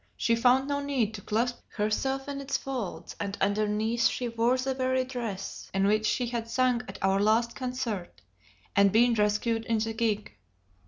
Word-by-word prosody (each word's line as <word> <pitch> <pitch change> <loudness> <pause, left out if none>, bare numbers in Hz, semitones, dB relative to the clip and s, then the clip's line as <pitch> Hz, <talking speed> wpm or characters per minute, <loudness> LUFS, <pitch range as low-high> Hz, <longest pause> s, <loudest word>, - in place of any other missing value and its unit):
she 230 - +2
found 250 +3 +4
no 285 0 0
need 260 -7 0
to 205 - -7
clasp 235 +4 -1
herself 265 +6 -1
in 280 -1 -4
its 275 0 -1
folds; 255 -8 -5
and 200 0 -3
underneath 215 +3 +1
she 250 - -2
wore 235 +2 +2
the 265 +1 -1
very 260 0 +1
dress 235 -7 -5
in 195 0 +3
which 215 +1 +2
she 250 - +1
had 235 -1 -3
sung 250 0 +2
at - - -8
our 195 0 +3
last 225 +3 +2
concert, 250 -8 -4 0.6
and 200 0 +5
been 235 +3 +5
rescued 215 +1 +1
in 230 -1 +2
the 225 +1 -1
gig. 220 -2 -1
230 Hz, 175 wpm, -28 LUFS, 210-255 Hz, 0.6 s, and